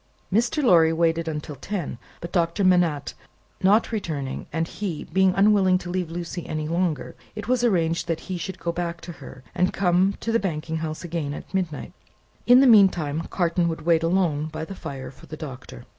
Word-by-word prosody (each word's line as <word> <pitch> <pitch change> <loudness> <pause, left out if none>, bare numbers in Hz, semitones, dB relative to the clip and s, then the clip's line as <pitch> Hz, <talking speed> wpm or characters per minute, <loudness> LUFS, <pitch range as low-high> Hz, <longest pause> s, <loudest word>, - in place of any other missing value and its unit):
Mr. 240 +8 +2
Lorry 165 -9 +6
waited 165 0 +1
until 150 -1 -4
ten; 165 - -5 0.2
but, 170 - -6
Doctor 170 +2 +1
Manette 175 -6 +2 0.5
not 205 +6 +4
returning, 155 - -4
and 165 0 -1
he 180 -7 -4
being 190 +2 +2
unwilling 195 -2 +4
to 175 -1 -7
leave 180 -2 -2
Lucie 170 0 -5
any 155 -1 -3
longer, 170 -3 -1 0.2
it 210 0 -6
was 250 -1 +1
arranged 170 -7 +1
that 165 -1 -2
he 185 - -5
should 180 +2 -5
go 170 - -2
back 170 0 -3
to 175 - -8
her, 135 -1 -11
and 180 0 +1
come 185 +1 +2
to 230 - -2
the 230 - +3
banking 160 -4 -3
house 155 0 -4
again 160 -4 -3
at - - -10
midnight. 180 -6 -3 0.5
In 245 +1 +8
the - - +6
meanwhile, 180 - +5
Carton 170 -1 +1
would 160 -2 -4
wait 165 -1 +4
alone 165 -3 +1
by 160 0 -5
the 195 - -8
fire 135 -7 -7
for - - -16
the 155 - -8
Doctor. 130 -4 -9
170 Hz, 190 wpm, -24 LUFS, 155-190 Hz, 0.5 s, In